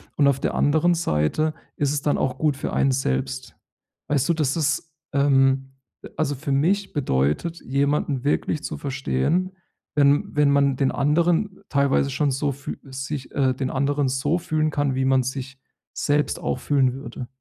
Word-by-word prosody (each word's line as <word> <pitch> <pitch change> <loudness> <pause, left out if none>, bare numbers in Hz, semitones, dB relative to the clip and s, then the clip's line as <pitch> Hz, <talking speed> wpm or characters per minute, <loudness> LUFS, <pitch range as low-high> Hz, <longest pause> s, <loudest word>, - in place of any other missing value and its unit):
Und 145 - +4
auf 140 -1 +2
der - - -1
anderen 160 +4 +3
Seite 155 - 0 0.2
ist 145 0 0
es 145 - -1
dann 145 - +1
auch 130 0 -1
gut 150 -2 +1
für 140 - -4
einen 135 - +2
selbst. 65 - -2 0.5
Weißt 145 -1 +1
du, 170 - +5
das 150 -3 0
ist 160 0 -1 0.2
ähm, 135 -1 +3 0.3
äh, - - -9
also, 145 -2 0
für 140 +2 -4
mich 180 +9 +1
bedeutet, 130 - 0
jemanden 140 0 0
wirklich 150 +1 0
zu - - -4
verstehen, 140 - -1 0.4
wenn 145 0 +3
wenn 150 -1 +4
man 140 -2 +3
den 135 -1 +2
anderen 170 +7 +1
teilweise 140 -1 +2
schon 145 +1 +1
so 140 +2 0
fü 135 +1 -7
sich 135 0 -6
äh, 130 -2 +2
den 130 0 -3
anderen 140 +1 +1
so 140 +6 0
fühlen 155 -2 0
kann, 145 -3 0
wie 130 0 0
man 130 -1 +3
sich 130 +1 -5 0.3
selbst 145 0 0
auch - - -2
fühlen 135 -4 +2
würde. 125 -2 -7
140 Hz, 170 wpm, -23 LUFS, 135-150 Hz, 0.5 s, du